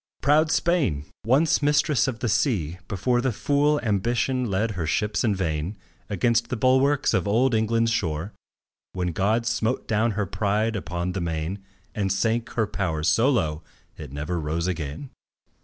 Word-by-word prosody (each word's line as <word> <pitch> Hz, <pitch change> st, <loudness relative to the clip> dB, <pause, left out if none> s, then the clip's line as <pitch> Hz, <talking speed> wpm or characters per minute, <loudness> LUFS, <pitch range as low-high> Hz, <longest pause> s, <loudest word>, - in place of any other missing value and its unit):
Proud 150 Hz, +4 st, +4 dB
Spain! 140 Hz, -, +1 dB, 0.2 s
once 145 Hz, +7 st, +3 dB
mistress 145 Hz, -3 st, +2 dB
of 120 Hz, -3 st, -4 dB
the 120 Hz, -, 0 dB
sea, 90 Hz, -, 0 dB
before 120 Hz, +6 st, 0 dB
The 130 Hz, 0 st, 0 dB
fool 145 Hz, +6 st, +1 dB
Ambition 120 Hz, +4 st, 0 dB
led 105 Hz, +4 st, 0 dB
her 90 Hz, -5 st, -3 dB
ships 105 Hz, +7 st, 0 dB
in 110 Hz, -4 st, +2 dB
vain 85 Hz, +1 st, -2 dB, 0.3 s
Against 115 Hz, +3 st, +1 dB
the 125 Hz, -, -2 dB
bulwarks 130 Hz, +4 st, +3 dB
of -, -, +1 dB
old 120 Hz, +5 st, +2 dB
England's 115 Hz, +1 st, +2 dB
shore, 90 Hz, -3 st, -2 dB, 0.6 s
When 90 Hz, -1 st, -1 dB
God 110 Hz, +7 st, +1 dB
smote 115 Hz, +1 st, -1 dB
down 110 Hz, +1 st, +1 dB
her 105 Hz, 0 st, -1 dB
pride 105 Hz, +3 st, 0 dB
upon 90 Hz, -2 st, -3 dB
the 95 Hz, 0 st, -3 dB
main 85 Hz, +4 st, -3 dB, 0.3 s
And 100 Hz, -2 st, -1 dB
sank 115 Hz, +4 st, 0 dB
her 110 Hz, -, +1 dB
power 95 Hz, -7 st, -2 dB
so 110 Hz, -, +3 dB
low, 80 Hz, -, 0 dB, 0.3 s
it 75 Hz, -4 st, -9 dB
never 75 Hz, +5 st, -3 dB
rose 80 Hz, +2 st, -2 dB
again. 90 Hz, -, -4 dB
105 Hz, 160 wpm, -25 LUFS, 90-120 Hz, 0.6 s, Proud